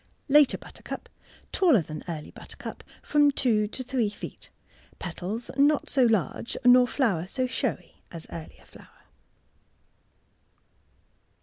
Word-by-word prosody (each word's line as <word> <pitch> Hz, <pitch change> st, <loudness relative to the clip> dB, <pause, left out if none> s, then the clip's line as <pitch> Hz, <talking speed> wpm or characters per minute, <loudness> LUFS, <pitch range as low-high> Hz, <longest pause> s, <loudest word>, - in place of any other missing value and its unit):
Later 295 Hz, -1 st, +5 dB
Buttercup.— -, -, -9 dB, 0.4 s
Taller 310 Hz, -, +4 dB
than 155 Hz, 0 st, -7 dB
early 155 Hz, -3 st, -6 dB
butter -, -, -12 dB
cup -, -, -8 dB, 0.2 s
(from 295 Hz, -1 st, +4 dB
two 230 Hz, -6 st, +2 dB
to 255 Hz, +5 st, -4 dB
three 245 Hz, -4 st, 0 dB
feet)— 205 Hz, -, -10 dB, 0.5 s
petals 190 Hz, +6 st, -5 dB
not 290 Hz, +1 st, +3 dB
so 260 Hz, -3 st, +4 dB
large 225 Hz, 0 st, 0 dB
nor 250 Hz, 0 st, +7 dB
flower 200 Hz, -, 0 dB
so 255 Hz, +5 st, -1 dB
showy 250 Hz, -, -3 dB
as 165 Hz, -2 st, -7 dB
earlier 70 Hz, -, -9 dB
flower. 60 Hz, -, -18 dB
235 Hz, 120 wpm, -27 LUFS, 175-270 Hz, 0.5 s, nor